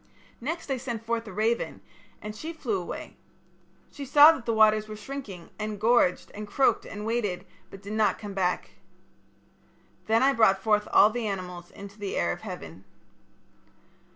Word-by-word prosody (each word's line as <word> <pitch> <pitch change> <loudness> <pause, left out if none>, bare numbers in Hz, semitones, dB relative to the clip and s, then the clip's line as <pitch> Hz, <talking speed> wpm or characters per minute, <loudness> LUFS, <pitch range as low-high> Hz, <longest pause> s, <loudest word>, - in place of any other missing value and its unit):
Next 310 +3 -4
I 265 - 0
sent 235 -3 -5
forth 230 0 -2
a - - -7
raven, 220 +4 -1 0.4
and 210 0 -6
she 320 +9 -6
flew 230 - -2
away. 175 - -8 0.7
She 285 - -8
saw 295 +3 +8
that 265 -8 -6
the - - +2
waters 215 0 +4
were 215 - -7
shrinking, 210 -6 -8
and 215 -1 -4
gorged 225 -4 +2
and 210 0 -7
croaked 265 +6 +2
and 210 0 -7
waded, 205 -5 -2 0.2
but 195 +1 -12
did 200 +2 -6
not 215 -1 +2
come 205 -2 -7
back. 180 -2 -1 1.4
Then 225 +3 +3
I 275 +1 +4
brought 220 -6 +4
forth 210 +1 +1
all 210 - +6
the 235 -1 -3
animals 180 -3 -5
into 200 +1 -12
the 200 -1 -4
air - - +1
of - - -6
heaven. 95 - -8
215 Hz, 170 wpm, -27 LUFS, 200-235 Hz, 1.4 s, saw